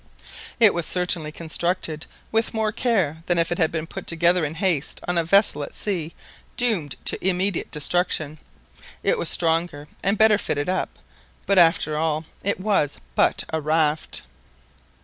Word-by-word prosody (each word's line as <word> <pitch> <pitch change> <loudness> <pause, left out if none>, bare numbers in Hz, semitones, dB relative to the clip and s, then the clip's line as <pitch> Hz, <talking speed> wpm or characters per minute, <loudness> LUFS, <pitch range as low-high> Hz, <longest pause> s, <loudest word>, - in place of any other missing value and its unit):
It 220 -3 +6
was 170 -2 -2
certainly 175 -4 0
constructed 165 0 -3 0.2
with 225 +1 0
more 220 -1 0
care 190 - 0
than 175 - +1
if 165 0 +1
it 175 - -2
had 160 -2 +3
been 160 -1 -3
put - - -9
together 170 +1 +2
in 150 +1 -3
haste 165 -4 -1
on 175 - 0
a 170 - +2
vessel 195 -2 +3
at - - -7
sea 170 -6 -3 0.4
doomed 210 - +1
to - - +1
immediate 190 0 0
destruction. 155 -1 +1 0.6
It - - +1
was - - 0
stronger 165 -3 +1 0.2
and 195 +3 +1
better 220 -1 +5
fitted 145 -2 -2
up; 185 - -2 0.5
but, 200 -2 +4
after 165 -3 +3
all, 155 0 -1 0.2
it 200 0 -1
was 185 -8 0 0.2
but - - +2
a 160 - -2
raft. 155 0 0
170 Hz, 160 wpm, -23 LUFS, 155-190 Hz, 0.6 s, It